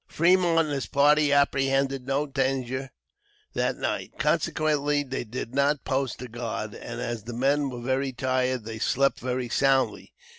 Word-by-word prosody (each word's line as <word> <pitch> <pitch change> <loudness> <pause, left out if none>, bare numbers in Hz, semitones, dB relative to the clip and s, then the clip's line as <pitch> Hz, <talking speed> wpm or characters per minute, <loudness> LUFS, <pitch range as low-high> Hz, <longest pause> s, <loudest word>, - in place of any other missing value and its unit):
Fremont 175 0 +3
and 155 -2 -2
his 135 -2 -2
party 145 +1 +4
apprehended 135 -1 +2
no 140 +2 +1
danger 135 -1 -2 0.6
that - - 0
night; - - -3
consequently, 150 -2 +1
they 130 -2 -4
did 120 +1 -6
not 140 +1 +1
post 135 -1 -1
a - - -6
guard, 115 -2 -5
and 120 0 -7
as 120 -3 -4
the 120 - -6
men 140 +4 +1
were 125 -2 -7
very 130 +2 0
tired 130 -2 -1
they 110 -1 -6
slept 140 +4 +1
very 125 0 -2
soundly. 135 +2 +1
135 Hz, 155 wpm, -26 LUFS, 125-140 Hz, 0.6 s, party